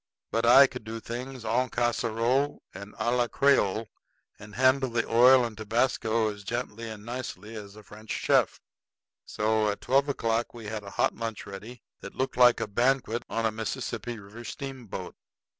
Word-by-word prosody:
But 115 Hz, +1 st, +1 dB
I 135 Hz, +3 st, +9 dB
could 125 Hz, -3 st, -6 dB
do 115 Hz, +1 st, -6 dB
things 125 Hz, +2 st, -7 dB
en 125 Hz, +3 st, +1 dB
casserole 120 Hz, +3 st, 0 dB
and 100 Hz, +2 st, -10 dB
à 120 Hz, +1 st, 0 dB
la 120 Hz, -1 st, +2 dB
creole, 115 Hz, -6 st, +2 dB, 0.5 s
and 105 Hz, 0 st, -12 dB
handle 130 Hz, +1 st, +3 dB
the 120 Hz, -1 st, -1 dB
oil 125 Hz, +2 st, +6 dB
and 115 Hz, -2 st, -6 dB
tobasco 110 Hz, 0 st, 0 dB
as 100 Hz, 0 st, -12 dB
gently 115 Hz, +1 st, -4 dB
and 105 Hz, -1 st, -9 dB
nicely 115 Hz, -4 st, -6 dB
as 100 Hz, -2 st, -9 dB
a 110 Hz, -, -13 dB
French 110 Hz, +1 st, -14 dB
chef. -, -, +2 dB, 0.7 s
So 110 Hz, 0 st, +1 dB
at 105 Hz, -, -3 dB
twelve 135 Hz, +3 st, +2 dB
o'clock 115 Hz, -3 st, -1 dB
we 115 Hz, -2 st, -9 dB
had 105 Hz, 0 st, -4 dB
a 100 Hz, -, -9 dB
hot -, -, +1 dB
lunch 115 Hz, -2 st, -5 dB
ready 105 Hz, +5 st, -10 dB, 0.2 s
that 100 Hz, -, -10 dB
looked 130 Hz, -, -2 dB
like 125 Hz, -1 st, +6 dB
a -, -, -1 dB
banquet 120 Hz, +2 st, +1 dB
on 115 Hz, 0 st, -1 dB
a 110 Hz, -, +2 dB
Mississippi 110 Hz, +2 st, -4 dB
River 105 Hz, +3 st, -11 dB
steamboat. 120 Hz, -8 st, -7 dB
115 Hz, 175 wpm, -28 LUFS, 110-125 Hz, 0.7 s, I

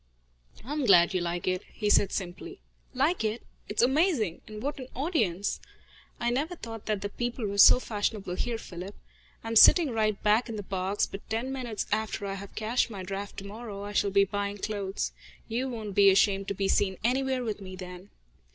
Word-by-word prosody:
"I 280 Hz, -, -4 dB
am 300 Hz, -1 st, -1 dB
glad 180 Hz, -1 st, +6 dB
you 185 Hz, -, 0 dB
like 175 Hz, +1 st, -3 dB
it," 185 Hz, 0 st, 0 dB
he 210 Hz, -, -3 dB
said 205 Hz, -1 st, +4 dB
simply. 200 Hz, -, -5 dB, 0.4 s
"Like 285 Hz, +3 st, +1 dB
it? 220 Hz, +2 st, -2 dB, 0.3 s
It's 210 Hz, -, +1 dB
amazing! 265 Hz, -, +2 dB
And 215 Hz, 0 st, -8 dB
what 285 Hz, +1 st, -3 dB
an 255 Hz, -, -7 dB
audience! 230 Hz, -, 0 dB, 0.6 s
I 240 Hz, 0 st, 0 dB
never 300 Hz, +8 st, -1 dB
thought 225 Hz, -7 st, -9 dB
that 210 Hz, -2 st, -1 dB
the 205 Hz, -, -3 dB
people 240 Hz, +1 st, -3 dB
were 200 Hz, 0 st, -2 dB
so 250 Hz, -, +9 dB
fashionable 205 Hz, -5 st, -2 dB
here, 230 Hz, +5 st, -2 dB
Philip. 185 Hz, -1 st, -8 dB, 0.5 s
I 225 Hz, -, -5 dB
am 230 Hz, -, -2 dB
sitting 310 Hz, +6 st, +8 dB
right 215 Hz, -2 st, 0 dB
back 215 Hz, +3 st, +3 dB
in 225 Hz, -, -4 dB
the 205 Hz, -, -5 dB
box, 190 Hz, +1 st, -1 dB
but 195 Hz, -, -10 dB
ten 230 Hz, +4 st, -2 dB
minutes 240 Hz, -6 st, -3 dB
after 215 Hz, -1 st, -1 dB
I 195 Hz, -, -3 dB
have 195 Hz, 0 st, -9 dB
cashed 225 Hz, +3 st, 0 dB
my 200 Hz, -4 st, -6 dB
draft 195 Hz, +2 st, -6 dB
tomorrow 200 Hz, 0 st, -7 dB
I 205 Hz, 0 st, -6 dB
shall 205 Hz, -, +2 dB
be 200 Hz, 0 st, +4 dB
buying 200 Hz, +1 st, -3 dB
clothes. 200 Hz, -1 st, -3 dB, 0.4 s
You 245 Hz, +4 st, -2 dB
won't 220 Hz, -4 st, -5 dB
be 200 Hz, 0 st, +6 dB
ashamed 195 Hz, 0 st, +3 dB
to 200 Hz, -, -2 dB
be 195 Hz, 0 st, 0 dB
seen 190 Hz, -1 st, +1 dB
anywhere 260 Hz, +1 st, +1 dB
with 215 Hz, -3 st, -4 dB
me 185 Hz, -1 st, -8 dB
then." 180 Hz, +1 st, -9 dB
210 Hz, 200 wpm, -28 LUFS, 195-240 Hz, 0.6 s, so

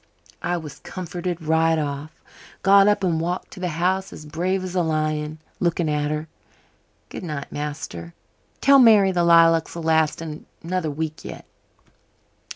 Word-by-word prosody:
I 175 Hz, 0 st, -1 dB
was 155 Hz, -4 st, -9 dB
comforted 175 Hz, -1 st, -5 dB
right 160 Hz, +1 st, +2 dB
off. 145 Hz, 0 st, -3 dB, 0.5 s
Got 195 Hz, +1 st, +6 dB
up 205 Hz, -1 st, +2 dB
and 165 Hz, -3 st, +1 dB
walked 175 Hz, +2 st, -3 dB
to 195 Hz, -, -10 dB
the 180 Hz, -, -2 dB
house 185 Hz, +4 st, -1 dB
as 155 Hz, -, -10 dB
brave 180 Hz, +5 st, -1 dB
as 185 Hz, -1 st, -5 dB
a 180 Hz, -, +1 dB
lion, 155 Hz, -1 st, -1 dB, 0.2 s
looking 170 Hz, -1 st, 0 dB
at 150 Hz, -1 st, 0 dB
her. 155 Hz, +1 st, -3 dB, 0.8 s
Goodnight, 150 Hz, -5 st, -6 dB
master. 145 Hz, -, -6 dB, 0.5 s
Tell 275 Hz, 0 st, +6 dB
Mary 215 Hz, -6 st, +6 dB
the 175 Hz, -2 st, +1 dB
lilacs'll 165 Hz, 0 st, +4 dB
last 160 Hz, -1 st, +2 dB
another 165 Hz, +2 st, -5 dB
week 155 Hz, +1 st, -4 dB
yet." -, -, -9 dB
165 Hz, 145 wpm, -23 LUFS, 155-180 Hz, 0.8 s, Got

